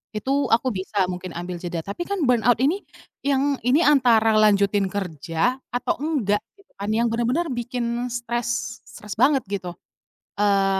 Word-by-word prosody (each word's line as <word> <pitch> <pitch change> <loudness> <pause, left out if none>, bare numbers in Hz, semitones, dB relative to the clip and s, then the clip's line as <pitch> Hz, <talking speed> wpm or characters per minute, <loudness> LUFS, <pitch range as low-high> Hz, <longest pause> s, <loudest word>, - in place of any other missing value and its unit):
itu 215 +6 -2 0.2
aku 245 +3 +2
bisa 195 +1 -1
mungkin 180 -1 -7
ambil 175 +1 -5
jeda, 170 -2 -4
tapi 205 - -5
kan 400 -5 -1
burnout 245 -2 +3
ini 325 +9 +2 0.5
yang 280 0 +1
ini 275 +7 +4
antara 230 -6 +4
lanjutin 200 -1 +3
kerja 185 - -2
atau 330 +7 -1
enggak 265 -10 0 0.2
gitu 395 -1 -25
kan, 200 +1 -3
yang 230 +1 +1
benar-benar 250 +8 0
bikin 240 0 -2
stres, 240 0 -3
stres 210 -1 -8
banget 270 +1 +4
gitu. 180 -3 -4 0.6
Eee 195 -1 +3
235 Hz, 150 wpm, -23 LUFS, 200-260 Hz, 0.6 s, ini